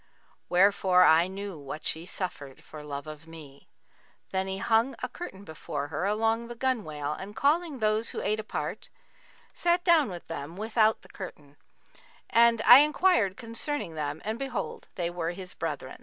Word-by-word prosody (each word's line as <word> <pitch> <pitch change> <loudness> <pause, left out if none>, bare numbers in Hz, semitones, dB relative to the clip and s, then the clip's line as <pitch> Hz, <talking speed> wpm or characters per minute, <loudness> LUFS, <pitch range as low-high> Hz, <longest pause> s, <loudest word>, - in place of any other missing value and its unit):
Wherefore 185 0 +5
I 165 0 +6
knew 195 -3 -6
what 145 +2 -8
she 165 +2 -3
suffered 145 -9 -5
for 155 -1 -10
love 140 -1 -6
of 155 +1 -10
me. 150 -4 -13 0.6
Then 190 0 -1
he 190 0 -3
hung 225 +5 +2
a - - 0
curtain 200 - -9
before 155 -4 -5
her 155 +6 -2
along 225 +2 0
the 240 - -8
gunwale 175 - -2
and 195 +6 -8
calling 305 +2 +1
those 215 0 +1
who - - -4
ate 215 +1 0
apart, 215 - -5 0.6
sat 350 0 +1
down 330 - +4
with 175 -2 -8
them 165 0 -6
without 220 +1 +2
the - - -17
curtain; 150 -7 -10 0.8
and 230 -1 +5
I 245 - +10
enquired 295 - +3
concerning 230 - -3
them 150 -2 -4
and 220 +2 -3
behold 270 -3 -4
they 175 -2 -2
were 175 -1 -3
his 185 0 -5
brethren. - - -5
195 Hz, 165 wpm, -28 LUFS, 160-230 Hz, 0.8 s, I